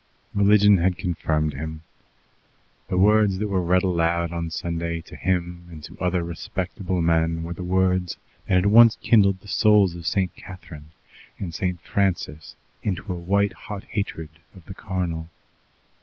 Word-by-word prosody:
Religion 105 0 +5
had 90 +1 +1
confirmed 80 -3 -1
him. 80 +2 -6 1.0
The 90 - -2
words 105 0 +4
that 105 +1 -2
were 95 -2 +1
read 90 +1 +2
aloud 85 -2 0
on 85 -1 -3
Sunday 85 0 -3
to - - -13
him 90 -1 -2
and 80 -3 -11
to - - -10
other 90 -1 0
respectable 90 +1 -3
men 80 0 +1
were 85 +1 -5
the 85 - -9
words 90 -1 +1 0.3
that 95 - +2
had 90 +1 +3
once 115 +2 +7
kindled 100 -4 +4
the - - -16
souls 105 -3 +4
of 85 -1 -7
St. 95 -3 0
Catharine 80 -5 -11 0.5
and 90 -4 -6
St. 90 0 -2
Francis 90 -6 -2 0.3
into 95 -1 -3
a - - -5
white 100 +4 0
hot 105 -2 -8
hatred 100 -7 -3 0.3
of 90 -3 -15
the - - -8
carnal. 90 -5 -4
90 Hz, 155 wpm, -23 LUFS, 85-100 Hz, 1.0 s, once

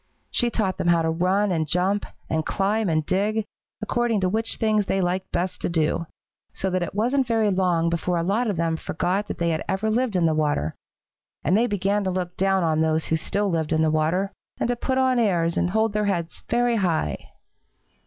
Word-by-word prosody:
She 240 - +2
taught 205 -5 -1
them - - -1
how 170 -1 +4
to 160 - +1
run 185 +4 +1
and 160 -3 0
jump 185 +5 +1 0.2
and 160 0 0
climb 205 +4 0
and 155 -1 +1
dig, 205 +4 0 0.4
according 235 -1 +1
to 185 - +2
which 225 +3 -1
things 215 -2 +1
they 195 - +1
liked 185 +1 -1
best 180 +1 -2
to - - -1
do, 165 0 0 0.5
so 190 - -2
that 185 0 0
it 175 - -4
wasn't 250 +5 +1
very 225 -3 +2
long 180 -3 +1
before 170 +1 0
a 165 - 0
lot 210 +7 +1
of 200 - -2
them 165 -1 0
forgot 185 +6 -1
that - - -5
they 170 -1 0
ever 190 +6 -2
had 215 - +1
lived 245 -4 0
in 175 -2 +3
the 160 - +3
water, 145 - 0 0.7
and 175 - +2
they 235 +3 +3
began 205 0 0
to - - +1
look 180 -1 -3
down 195 -1 +2
on 160 -1 +1
those 160 0 +1
who 160 - +1
still 200 +5 -1
lived 160 -2 -1
in 160 0 +3
the 155 - +2
water, 165 +6 +1 0.3
and - - 0
to 245 - +1
put 260 +2 -1
on 260 -1 +3
airs 170 -7 +2
and 175 - +1
hold 220 +2 +1
their 210 0 0
heads 175 -5 -2
very 240 -1 +2
high. 165 - -1
185 Hz, 220 wpm, -24 LUFS, 165-210 Hz, 0.7 s, how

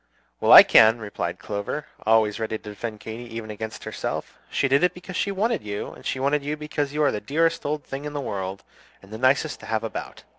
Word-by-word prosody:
"Well, - - +2
I - - +13
can," 110 +1 +6
replied 95 -5 -4
Clover, 100 +10 -4 0.2
always 110 -1 +3
ready 110 0 -2
to 105 - -11
defend 110 +1 -6
Katy 115 +2 -7
even 110 -1 -5
against 110 +1 -7
herself. - - -4
"She 135 - +1
did 140 +4 +3
it 180 0 +2
because 180 +1 -9
she 200 - 0
wanted 215 +3 0
you, 105 -1 -5
and - - -14
she 130 - -2
wanted 140 +2 +1
you 150 +2 -3
because 150 -2 -3
you 150 +1 0
are 145 - +4
the 105 - -4
dearest 165 +7 0
old 150 0 -2
thing 135 +2 -6
in 150 - -5
the 145 - -3
world, 100 -6 -4 0.4
and 100 +2 -13
the 110 - -6
nicest 135 +4 +2
to - - -11
have 110 0 -1
about. 115 - -6
120 Hz, 230 wpm, -24 LUFS, 105-150 Hz, 0.4 s, I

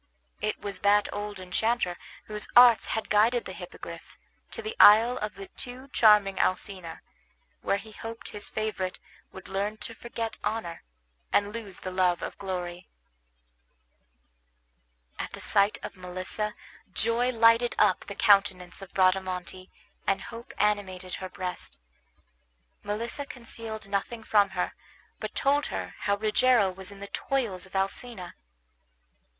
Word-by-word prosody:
It 215 - -1
was 200 -1 -5
that 205 +1 +4
old 205 -1 -5
enchanter 185 +1 0 0.3
whose 210 0 -4
arts 240 -2 +8
had 220 - -2
guided 230 +3 +3
the - - -6
Hippogriff - - -10 0.3
to 460 - -7
the 435 +1 -4
isle 225 +4 +8
of 210 -2 -4
the 195 - -8
too 255 +2 -7
charming 210 -5 +5
Alcina, 185 -3 -2 0.6
where 195 - +1
he 215 +2 -11
hoped 225 +2 -8
his 205 -1 -4
favorite 195 -4 -2 0.3
would 190 - -11
learn 200 +3 -2
to 230 - -6
forget 230 -1 -5
honor, 215 -7 -3 0.5
and 205 0 +2
lose 210 -5 -7
the 185 - -4
love 180 -1 +2
of - - -4
glory. 180 -2 -4 2.3
At - - -4
the - - -7
sight 200 +1 +3
of - - -6
Melissa 185 +3 -4 0.4
joy 230 +5 +1
lighted 230 0 +4
up - - +3
the - - -7
countenance 195 -3 +3
of 195 - -11
Bradamante, 185 -1 +1 0.4
and 195 0 +2
hope 235 +4 -9
animated 190 -3 0
her 185 - -5
breast. 180 0 -5 1.0
Melissa 230 +7 -3
concealed 225 -4 -7
nothing 205 +3 -2
from 205 -2 +4
her, - - 0 0.5
but - - -5
told 285 +2 +2
her - - -4
how 200 0 +1
Rogero 215 -1 +3
was 190 +1 -7
in 200 0 -12
the 200 - -6
toils 215 -10 -1
of 190 - -15
Alcina. 195 0 -2
205 Hz, 140 wpm, -28 LUFS, 190-230 Hz, 2.3 s, arts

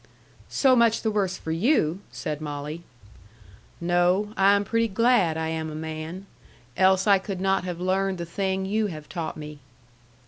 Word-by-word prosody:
"So 265 -2 +4
much 230 -2 +3
the 220 - +1
worse 195 -3 0
for 160 - -5
you!" 175 - +2
said 150 -1 -5
Molly. 150 +2 -5 1.0
"No. 175 +4 +1
I 195 +1 +5
am 200 - +1
pretty 230 +2 +1
glad 210 -6 +2
I 160 0 -2
am 160 -1 -3
a 155 - -7
man. 160 +4 -6 0.5
Else 190 +2 +4
I 200 -2 +5
could 190 -1 -5
not 195 0 +1
have 175 -2 -4
learned 190 +1 0
the 170 - -4
thing 190 +2 -2
you 210 +2 0
have 155 -5 -8
taught 165 -4 -5
me." 150 -1 -8
185 Hz, 170 wpm, -25 LUFS, 160-200 Hz, 1.0 s, I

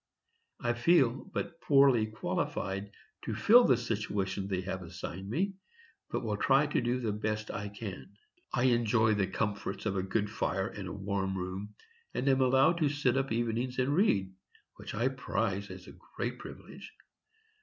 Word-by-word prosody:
I 120 0 0
feel 130 +1 +4
but 170 -3 -5
poorly 135 -6 +5
qualified 100 -2 -3 0.4
to - - -2
fill 240 +3 +7
the 125 - +4
situation 100 -4 -2
they 95 -2 -1
have 95 0 -4
assigned 90 +2 -7
me, 190 - 0 0.6
but - - -2
will 105 -2 -1
try 135 +6 +4
to 145 - 0
do 120 +1 0
the 115 -4 -1
best 110 +1 -2
I 100 +1 -4
can.... 100 -2 -8 0.4
I 120 - 0
enjoy 120 -3 +3
the 100 -2 +1
comforts 100 -1 -3
of 100 -3 0
a - - +1
good 100 +3 -1
fire 95 -2 -1
and 100 -4 -7
a - - -5
warm 95 -1 -2
room, 95 +3 -5 0.4
and 135 - -1
am 135 -1 +4
allowed 135 +6 +4
to 150 -3 +3
sit 140 -3 +1
up 135 0 0
evenings 120 +2 -1
and 130 +2 +1
read, 100 - +2 0.4
which - - -7
I 115 +4 +2
prize 110 -6 -2
as - - -9
a - - -12 0.2
great - - -2
privilege.... - - -10
110 Hz, 170 wpm, -31 LUFS, 100-130 Hz, 0.6 s, fill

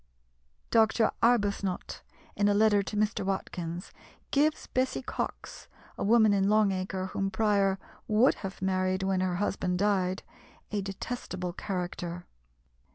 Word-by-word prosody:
Dr. 220 0 +4
Arbuthnot, 205 -5 +1 0.3
in 205 - +2
a 205 - +3
letter 210 -1 +4
to 210 +2 -5
Mr. 210 -1 +1
Watkins, 180 -2 -4 0.4
gives 300 +2 +2
Bessy 260 +1 -1
Cox - - -5 0.3
a - - -4
woman 220 0 +5
in 195 0 +2
Long 215 -1 +4
Acre 185 0 -3
whom 195 0 0
Prior 195 -1 +2 0.3
would 220 +5 +4
have 190 -1 -6
married 185 0 0
when 190 -1 +1
her 185 -1 0
husband 185 -1 -1
died 190 -1 +1 0.5
a 205 -1 -1
detestable 190 -2 -5
character. 175 -2 -4
195 Hz, 130 wpm, -29 LUFS, 185-215 Hz, 0.5 s, woman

